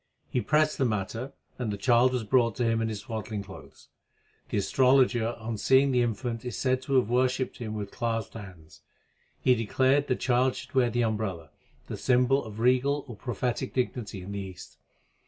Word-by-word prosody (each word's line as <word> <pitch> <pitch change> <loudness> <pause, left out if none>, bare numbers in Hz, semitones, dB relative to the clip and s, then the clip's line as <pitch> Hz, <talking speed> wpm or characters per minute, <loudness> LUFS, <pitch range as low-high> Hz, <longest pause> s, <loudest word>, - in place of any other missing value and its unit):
He 125 - +1
pressed 155 +6 +2
the 135 - +3
matter, 115 +4 -2 0.3
and 120 -4 -2
the 100 - -4
child 120 +4 +4
was 125 -3 -1
brought 115 0 +2
to 125 - -1
him 115 -1 +1
in 115 - 0
his 105 -2 -5
swaddling 110 -4 -5
clothes. 95 -1 -14 0.6
The - - -1
astrologer 125 +1 +3
on 110 -1 -5
seeing 135 +3 +4
the 125 -1 +3
infant 115 0 -2
is 125 - -5
said 130 -1 +1
to 135 +1 -2
have 125 -4 +4
worshipped 130 +2 0
him 110 -3 -5
with 100 -2 -5
clasped 115 -2 -2
hands. 90 -8 -12 0.6
He 130 - +5
declared 130 +5 +2
the 130 - +1
child 125 +1 +1
should - - -9
wear 130 -3 +3
the 120 +1 0
umbrella, 100 -9 -3 0.3
the - - -6
symbol 125 +2 +2
of 110 0 -9
regal 130 +4 +2
or 120 - -8
prophetic 125 +3 -3
dignity 115 -6 -2
in 95 - -8
the 100 - -4
East. 95 -2 -9
120 Hz, 190 wpm, -28 LUFS, 110-130 Hz, 0.6 s, He